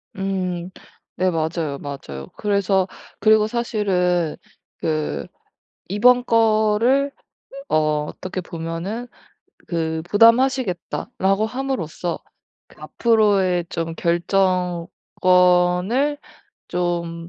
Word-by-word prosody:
음 185 -2 -3 0.5
네, 185 0 +2
맞아요, 160 -3 -2
맞아요. 70 - -7
그래서 200 -2 +1 0.3
그리고 215 -1 +5
사실은 190 -8 0 0.4
그 155 -1 -2 0.6
이번 245 +6 +4
거를 230 +4 +3 0.6
어 155 -1 +1
어떻게 185 +3 -6
보면은 170 +8 -5 0.6
그 160 -2 -2
"부담하시겠다."라고 220 -3 +2
함으로써 220 - -3 0.5
그 - - -19
앞으로의 200 -6 +2
좀 165 0 -3
결정권을 180 - +1 0.5
좀 170 -1 -2
185 Hz, 185 characters per minute, -21 LUFS, 170-215 Hz, 0.6 s, 그리고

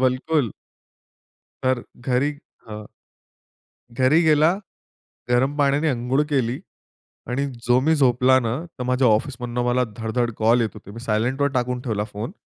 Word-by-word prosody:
बिलकुल. 130 0 +1 1.1
तर 130 -2 +1 0.2
घरी 130 +3 +2 0.4
हं. 105 -1 -7 1.1
घरी 130 +7 +3
गेला, 155 +2 +4 0.8
गरम 130 +4 +2
पाण्याने 145 +2 +2
अंघोळ 130 +2 0
केली 130 +1 0 0.7
आणि 140 +3 -1 0.2
जो 125 +1 +4
मी 160 +4 +3
झोपला 130 -2 +4
ना 115 +1 -1 0.2
तर 125 - -3
माझ्या 125 0 +2
ऑफिसमधनं 120 +2 -1
मला 125 +1 +2
धडधड 115 +1 -1
कॉल 115 +2 +3
येत 110 - 0
होते. 100 -2 -12
मी 115 - -9
सायलेंटवर 125 +5 0
टाकून 125 -1 -1
ठेवला 105 -4 -2
फोन. 110 - -6
125 Hz, 135 wpm, -22 LUFS, 120-140 Hz, 1.1 s, गेला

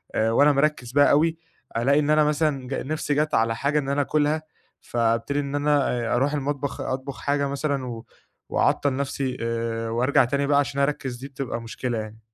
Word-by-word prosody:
آآ، 110 +1 +2
وأنا 145 +5 +5
مركِّز 140 -4 0
بقى 145 +1 +5
أوي، 160 +3 +3 0.4
ألاقي 140 +5 +3
إن 150 - 0
أنا 155 0 +5
مثلًا 150 -3 0
ج 135 - -4
نفسي 150 +1 -2
جات 150 +1 0
على 115 0 +2
حاجة 145 +4 +1
إن 135 - -4
أنا 140 +1 +1
آكُلها، 150 +2 +1 0.4
فابتدي 115 +4 0
إن 140 0 -3
أنا 145 -1 +2
آآ، 120 -1 -1
أروح 135 +4 +1
المطبخ، 140 -1 -2
أطبخ 130 +1 -4
حاجة 140 0 0
مثلًا، 140 -1 -2
و 115 -2 -7 0.4
وأعطِّل 140 -2 +1
نفسي 135 -1 -2
آآ، 115 0 -2
وأرجع 125 +4 +3
تاني 140 +3 0
بقى 145 -1 +4
عشان 140 -1 -1
أركِّز. 135 -3 -1
دي 135 - -8
بتبقى 135 -3 -5
مشكلة 115 +1 -4
يعني. 110 0 -6
140 Hz, 190 wpm, -24 LUFS, 120-145 Hz, 0.4 s, وأنا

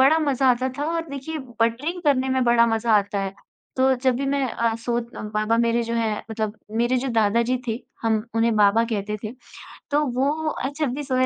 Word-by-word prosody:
बड़ा 280 +5 +6
मज़ा 275 -4 +2
आता 255 +1 +1
था 290 - -1
और 330 -1 -3
देखिए 280 +3 -5 0.2
बटरिंग 275 +11 0
करने 270 -4 +2
में 260 0 +1
बड़ा 235 -1 +5
मज़ा 225 0 +1
आता 200 0 0
है। 195 0 -3 0.4
तो 265 0 +4
जब 255 0 +1
भी 275 +2 -2
मैं 275 0 +1
अ, 230 -1 0
सोत 235 0 -3
बाबा 215 +1 -1
मेरे 235 0 +2
जो 230 0 -3
है 225 -2 +1 0.2
मतलब 220 -1 -3 0.2
मेरे 240 +2 +2
जो 265 +2 -2
दादा 225 -1 +2
जी 250 +2 0
थे, 225 +2 -2 0.2
हम 220 -2 +1
उन्हें 230 0 +2
बाबा 210 +2 +4
कहते 210 -2 -3
थे। 215 - -4 0.6
तो 295 +1 +3
वो 265 +2 +1 0.2
अ, 270 - -3
जब 300 -6 0
भी 295 - -4
सोए 255 -2 +1
235 Hz, 215 wpm, -23 LUFS, 225-265 Hz, 0.6 s, बड़ा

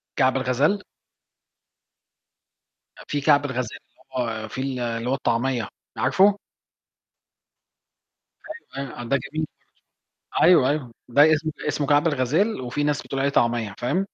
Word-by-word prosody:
كعب 130 -1 +3
الغزال؟ 135 +10 +1 2.2
آآ، - - -12
في 145 -1 -2
كعب 145 0 +4
الغزال 125 -4 -3
اللي - - -28 0.4
هو - - -6
فيه 130 - -5
ال 135 -2 -3
اللي 115 0 -2
هو - - +1
الطعمية، 125 -2 0 0.3
عارفه؟ 200 +1 +4 2.4
أيوه، 140 - -2
أيوه، - - -11
آه - - -5
ده 140 +4 +1
جميل 155 +3 -4 0.9
برضو. - - +4
أيوه، 160 -6 +6
أيوه. 140 -5 -2 0.2
ده 145 +5 +6
اسم 155 +1 0 0.2
اسمه 145 -1 -1
كعب 145 +2 +4
الغزال 155 - +1
وفي 125 +4 -2
ناس 145 -1 0
بتقول 135 - -5
عليه 140 - +2
طعمية، 120 -6 +1
فاهم؟ 180 +11 0
140 Hz, 140 wpm, -24 LUFS, 125-150 Hz, 2.4 s, أيوه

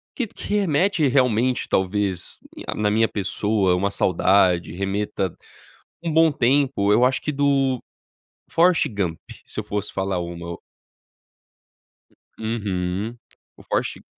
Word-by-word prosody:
que 250 - -1
que 205 - -4
remete 180 -3 +2
realmente 125 -1 +2
talvez 95 -1 -1 0.3
a - - -2
na 105 -1 +1
minha 110 +1 +3
pessoa 100 -1 0
uma 100 +2 0
saudade, 90 -2 +2
remeta 95 -1 -2 0.7
um 165 - -1
bom 160 -1 +5
tempo, 130 -6 +2
eu 120 - +4
acho 130 - +1
que 150 - -2
do 135 -3 +2 0.7
Forrest 170 -2 +4
Gump 95 -6 -2 0.3
se - - -7
eu - - -3
fosse 105 0 -4
falar 95 -1 -1
uma, 85 0 -6
o - - -10 1.8
uhum, 105 -1 -2 0.4
o - - -15
Forrest - - -2
Gu - - -20
105 Hz, 130 wpm, -23 LUFS, 95-135 Hz, 1.8 s, bom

